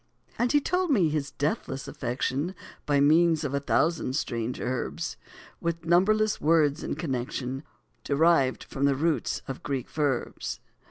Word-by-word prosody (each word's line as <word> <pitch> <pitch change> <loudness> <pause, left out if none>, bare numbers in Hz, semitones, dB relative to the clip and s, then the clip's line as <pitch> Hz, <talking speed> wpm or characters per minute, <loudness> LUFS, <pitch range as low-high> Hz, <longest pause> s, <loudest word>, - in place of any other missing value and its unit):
And 240 0 +2
he 295 - +5
told 360 +4 0
me 195 - +4
his 150 -2 -1
deathless 145 -3 -2
affection, 140 +5 -2 0.3
By 145 -1 +3
means 160 +2 +4
of 140 -2 -2
a 140 - +1
thousand 145 -1 +1
strange 120 -4 -2
herbs, 125 0 -3 0.4
With 170 -1 -3
numberless 210 +5 +3
words 155 -2 +3
in - - -2
connection, 130 -2 -3 0.4
Derived 145 -3 +3
from 135 - -2
the 140 -1 +3
roots 160 +3 0
of 135 - -5
Greek 135 -3 -3
verbs. 145 -5 -2
150 Hz, 145 wpm, -27 LUFS, 135-170 Hz, 0.4 s, he